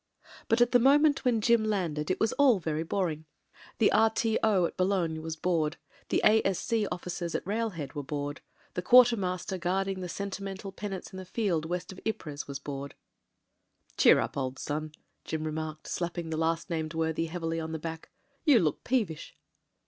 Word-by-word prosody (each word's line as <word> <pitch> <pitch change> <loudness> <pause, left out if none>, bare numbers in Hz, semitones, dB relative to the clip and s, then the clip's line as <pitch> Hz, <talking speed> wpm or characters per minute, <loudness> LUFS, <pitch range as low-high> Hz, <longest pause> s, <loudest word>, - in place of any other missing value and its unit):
But 225 +2 +3
at 240 - +4
the 245 - +6
moment 285 +3 +4
when 240 -3 +2
Jim 235 0 +4
landed 175 -8 -1
it 185 - 0
was 220 - +2
all 270 -6 +5
very 160 -3 -2
boring. 165 -2 -2 0.5
The 220 - +4
R.T.O. 220 -3 +3
at - - -4
Boulogne 185 -4 0
was 160 0 -4
bored; 160 -1 0 0.3
the - - +2
A.S.C 215 0 +2
officers 175 -1 -4
at - - -2
railhead 200 -8 -3
were 145 - -3
bored; 145 +1 -4 0.3
the 180 - -2
quarter 245 +4 +7
master 185 -1 -3
guarding 190 +2 -1
the 180 -2 -5
regimental 195 0 -5
penates 195 -1 -6
in 190 - -6
a - - -6
field 180 -5 -1
west 175 +3 -3
of 190 - -10
Ypres 155 -9 -4
was 140 -1 -4
bored. 140 0 -6 1.0
"Cheer - - +6
up, - - -2
old 130 -1 -2
son," 155 +1 -3 0.3
Jim 160 -1 -3
remarked, 155 0 -4
slapping 170 -1 -3
the - - -1
last 165 +2 -1
named 160 -1 -2
worthy 160 0 0
heavily 165 -1 -3
on 160 0 -4
the 160 - -2
back. 160 0 -7 0.3
"You 290 -6 +6
look 160 -8 +1
peevish." 210 -14 -1
180 Hz, 175 wpm, -29 LUFS, 160-210 Hz, 1.0 s, quarter